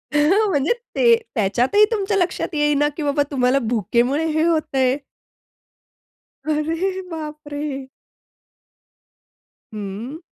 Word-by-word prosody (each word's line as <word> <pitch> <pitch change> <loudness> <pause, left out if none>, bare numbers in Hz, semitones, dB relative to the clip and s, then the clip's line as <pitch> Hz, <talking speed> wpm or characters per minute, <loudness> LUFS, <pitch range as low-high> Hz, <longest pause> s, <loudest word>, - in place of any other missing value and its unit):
म्हणजे 335 - +3 0.2
ते 470 -1 +6 0.2
त्याच्यातही 240 - +3
तुमच्या 405 -2 0
लक्षात 360 -1 0
येईना 295 -1 +2
की 315 - -3
बाबा 290 0 +1
तुम्हाला 260 0 +2
भुकेमुळे 240 - +1
हे 315 +1 +1
होतंय. 275 -6 +1 1.5
अरे 325 +5 -1
बाप 305 -2 -6
रे! 285 -2 -4 1.9
हं. 210 +7 -6
295 Hz, 95 wpm, -21 LUFS, 260-330 Hz, 1.9 s, ते